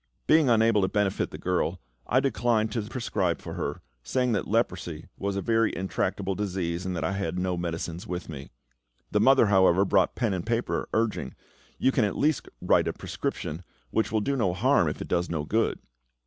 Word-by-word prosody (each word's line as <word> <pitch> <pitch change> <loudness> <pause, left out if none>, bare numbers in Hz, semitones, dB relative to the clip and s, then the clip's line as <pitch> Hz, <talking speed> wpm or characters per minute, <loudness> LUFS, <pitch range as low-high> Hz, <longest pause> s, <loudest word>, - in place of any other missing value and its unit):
Being 155 -4 +5
unable 115 -2 +4
to 95 - +2
benefit 100 -1 0
the - - -8
girl, 90 -1 -1 0.3
I 130 - +3
declined 120 -5 +1
to 115 - -1
prescribe 105 -6 -1
for - - -7
her, - - -4 0.2
saying 125 - 0
that 105 - -1
leprosy 90 -7 -1
was 100 0 -3
a 100 - -2
very 115 -1 +2
intractable 95 +1 -1
disease, 95 -3 -2
and 90 - -2
that 80 - -2
I 80 - 0
had 95 -3 -2
no 90 0 0
medicines 85 +2 -4
with 90 -1 -4
me. 70 -4 -8 0.6
The 105 - +2
mother, 135 +3 +6
however, 95 -2 +4
brought 95 -1 +2
pen 115 -6 0
and 90 -2 -2
paper, 115 +1 -1
urging, 110 -1 -1 0.4
"You 130 - +3
can 125 - +2
at 105 - -1
least 155 +1 +1
write - - +3
a - - -1
prescription, 80 +3 -4 0.3
which 110 - 0
will 110 -1 +1
do 140 +6 0
no 95 -9 +1
harm, 125 - +3
if 75 - -3
it - - -10
does 85 +1 0
no 80 -3 -2
good." 110 +8 +1
100 Hz, 195 wpm, -27 LUFS, 90-115 Hz, 0.6 s, mother